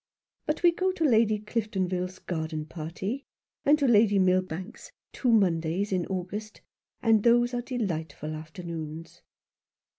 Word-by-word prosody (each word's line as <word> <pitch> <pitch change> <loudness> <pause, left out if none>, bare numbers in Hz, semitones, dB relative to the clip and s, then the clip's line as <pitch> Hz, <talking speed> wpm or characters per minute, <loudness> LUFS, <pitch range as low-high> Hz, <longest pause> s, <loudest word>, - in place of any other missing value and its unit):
But 300 +3 -1
we 345 - +7
go 370 +2 0
to 330 - -2
Lady 220 -5 +4
Cliftonville's 190 -4 -2
garden 160 -2 -4
party, 180 - -5 0.4
and 295 +2 +5
to 285 -3 +1
Lady 210 -3 +5
Milbank's 185 +2 0 0.2
two 250 - +1
Mondays 185 -2 +2
in 185 -2 0
August, 195 +4 -5 0.4
and 225 -2 +5
those 240 +2 +4
are 245 - -1
delightful 160 - -3
afternoons." 160 0 -7
195 Hz, 125 wpm, -28 LUFS, 170-230 Hz, 0.4 s, we